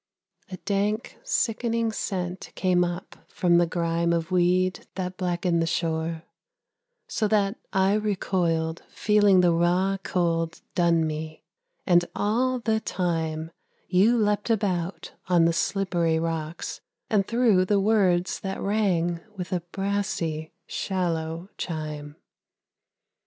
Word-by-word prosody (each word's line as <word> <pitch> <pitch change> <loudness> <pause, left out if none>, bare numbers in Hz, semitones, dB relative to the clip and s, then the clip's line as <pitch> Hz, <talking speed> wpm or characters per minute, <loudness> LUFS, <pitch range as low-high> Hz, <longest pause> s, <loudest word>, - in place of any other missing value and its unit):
A 185 - -6
dank, 205 +4 -2
sickening 230 - 0
scent 185 -4 -4
came 180 -1 +2
up 175 +1 -5
from 175 -1 +3
the 175 - +3
grime 170 0 0
Of 165 +1 -1
weed 185 +1 +2
that 180 -1 -3
blackened 175 -2 0
the 165 - 0
shore, 160 0 -1 0.8
so 215 - 0
that 205 0 +1
I 190 +1 +3
recoiled 175 -6 0
Feeling 205 -3 +4
the 175 -1 +4
raw 180 +3 +2
cold 165 -3 -1
dun 170 -2 +3
me: 155 0 -5 0.4
and 175 -2 +5
all 250 +5 +1
the 225 -2 0
time 160 -5 -2 0.4
You 200 +6 +4
leapt 210 0 +1
about 195 -5 -1
on 175 -2 +4
the 165 - +3
slippery 175 -3 +1
rocks, 165 0 -3 0.3
and 200 -3 +1
threw 230 -6 +3
The 200 +2 +2
words 195 -4 +2
that 195 -1 -4
rang 180 -5 +1 0.2
with 180 0 -4
a 180 - +1
brassy, 175 -3 -2
shallow 170 -2 -2
chime. 150 -3 -5
180 Hz, 120 wpm, -26 LUFS, 165-200 Hz, 0.8 s, and